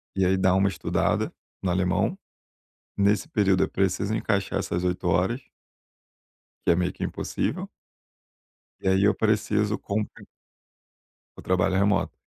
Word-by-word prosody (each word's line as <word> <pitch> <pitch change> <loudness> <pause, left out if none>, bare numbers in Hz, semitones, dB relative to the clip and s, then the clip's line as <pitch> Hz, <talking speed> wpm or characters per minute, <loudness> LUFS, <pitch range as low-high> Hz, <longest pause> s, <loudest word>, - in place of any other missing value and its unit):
e 95 - +2
aí 95 +1 +3
dar 95 0 +3
uma 95 +1 +3
estudada 95 - 0 0.3
no 95 - 0
alemão. 90 0 +1 0.8
Nesse 100 +8 +2
período 100 - +3
eu - - -1
preciso 95 +2 0
encaixar 100 -3 0
essas 85 +1 -2
8 90 0 -1
horas 90 +10 +1 1.3
Que - - +6
é 85 - +2
meio 90 0 0
que - - -5
impossível. - - -3 1.1
E - - -1
aí 95 +1 +3
eu 105 - +4
preciso 105 -1 +1
compen 105 +1 -4 1.1
O - - -10
trabalho 95 0 +1
remoto. 100 +1 +1
95 Hz, 135 wpm, -26 LUFS, 90-105 Hz, 1.3 s, Que